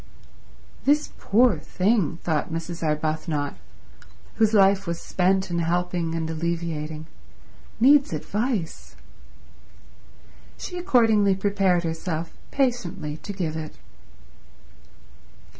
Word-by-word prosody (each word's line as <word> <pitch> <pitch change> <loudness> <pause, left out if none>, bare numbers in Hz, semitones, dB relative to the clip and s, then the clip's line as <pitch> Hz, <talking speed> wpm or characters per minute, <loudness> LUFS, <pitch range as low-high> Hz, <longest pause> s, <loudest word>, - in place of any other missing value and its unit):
"This 295 +2 +2
poor 220 -4 +3
thing," 185 0 0
thought 160 -2 -1
Mrs. 165 +1 -5
Arbuthnot, 155 -1 -1 0.8
whose 220 -1 +4
life 195 -2 +4
was 170 0 -2
spent 190 0 +1
in 170 - 0
helping 170 0 -1
and 165 -1 -2
alleviating, 160 -2 -3 0.7
"needs 275 +4 +5
advice." 195 - -3 1.6
She 360 - -6
accordingly 225 - +4
prepared 195 -3 +1
herself 165 0 -3 0.2
patiently 235 - -1
to 205 - -7
give 175 -6 -3
it. 155 -1 -6
175 Hz, 90 wpm, -24 LUFS, 160-205 Hz, 1.6 s, needs